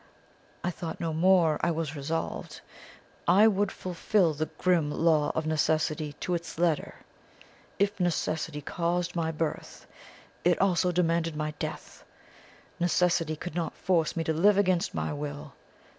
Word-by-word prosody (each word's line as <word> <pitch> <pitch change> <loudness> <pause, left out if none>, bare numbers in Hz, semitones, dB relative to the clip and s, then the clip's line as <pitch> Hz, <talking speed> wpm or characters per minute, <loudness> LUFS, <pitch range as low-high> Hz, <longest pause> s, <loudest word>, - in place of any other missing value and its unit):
I 180 - 0
thought 165 -1 -6
no 165 -1 -2
more; 170 -2 +4
I - - +2
was 160 -2 -2
resolved. 160 +3 -4 0.7
I 200 +5 +6
would 205 -2 +1
fulfil 180 -1 +1
the 155 +1 -2
grim 175 -5 +1
Law 155 -1 +2
of 160 - -1
Necessity 155 -1 0
to 180 - -1
its 170 -2 -4
letter. 165 -3 0 0.8
If 200 0 0
Necessity 160 -3 -1
caused 175 +3 -2
my 165 -2 0
birth, 160 0 -4 0.6
it 175 0 +3
also 180 -2 +2
demanded 165 -2 +1
my 150 0 -2
death. - - -6 0.8
Necessity 175 -2 +2
could 175 +2 -7
not 170 -1 -3
force 170 -4 +1
me 165 - -1
to 160 - 0
live 195 +6 +4
against 185 -1 +1
my - - -2
will. 145 -1 -6
165 Hz, 145 wpm, -28 LUFS, 155-180 Hz, 0.8 s, I